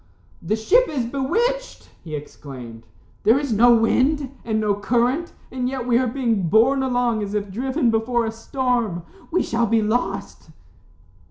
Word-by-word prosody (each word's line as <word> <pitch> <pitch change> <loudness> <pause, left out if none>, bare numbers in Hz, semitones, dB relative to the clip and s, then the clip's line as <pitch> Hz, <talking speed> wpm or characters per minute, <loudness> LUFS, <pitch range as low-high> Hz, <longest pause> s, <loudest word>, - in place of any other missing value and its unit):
"The 215 - -1
ship 465 - +3
is 270 -6 -2
bewitched," 455 - -2
he 155 -3 -6
exclaimed. 125 -6 -10 0.3
"There 225 +4 +4
is 280 -4 -1
no 240 +3 +6
wind, 260 +5 +1
and 220 -1 -1
no 210 -1 +1
current, 245 - 0 0.2
and 250 0 -2
yet 260 -2 -4
we 240 -1 +3
are 255 - +1
being 230 -8 0
borne 245 +7 +4
along 245 -4 0
as 205 0 -4
if 205 -1 -2
driven 255 +4 0
before 230 +1 0
a 225 - -2
storm. 230 -5 -2 0.3
We 360 - +1
shall 235 0 0
be 225 0 +2
lost." 200 -6 -2
235 Hz, 160 wpm, -22 LUFS, 215-265 Hz, 0.3 s, no